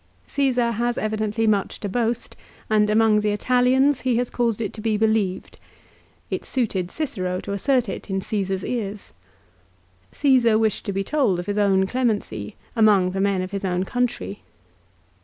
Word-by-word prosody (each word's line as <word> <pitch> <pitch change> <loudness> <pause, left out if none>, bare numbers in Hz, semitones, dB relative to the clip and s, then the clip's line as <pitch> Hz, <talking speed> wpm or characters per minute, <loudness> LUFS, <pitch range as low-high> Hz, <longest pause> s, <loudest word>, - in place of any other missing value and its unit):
Csesar 250 -4 +1
has 240 +1 0
evidently 215 +1 -1
much 205 -3 0
to 205 - -2
boast, 235 +3 -2 0.4
and 210 -1 +3
among 215 0 +4
the 210 0 0
Italians 255 +5 +2
he 255 -2 +1
has 245 +1 -1
caused 235 -3 0
it 215 -4 -3
to 215 - -8
be 215 -1 0
believed. 215 -4 0 0.7
Jt - - -2
suited 200 -8 -1
Cicero 185 -12 -3
to - - -6
assert 245 +4 +1
it 195 - -6
in 195 0 -1
Csesar's 190 -1 -2
ears. 210 -4 -4 1.0
Csesar 250 -6 +3
wished 220 -2 0
to - - 0
be 195 0 -1
told 245 -6 +1
of 175 - -4
his 205 +1 -1
own 195 -2 +3
clemency, 205 - -2 0.2
among 205 -5 +4
the 195 +1 -2
men 195 -2 +1
of 185 - -6
his 200 -1 -4
own 180 -1 0
country. 190 - -2
215 Hz, 165 wpm, -23 LUFS, 195-240 Hz, 1.0 s, among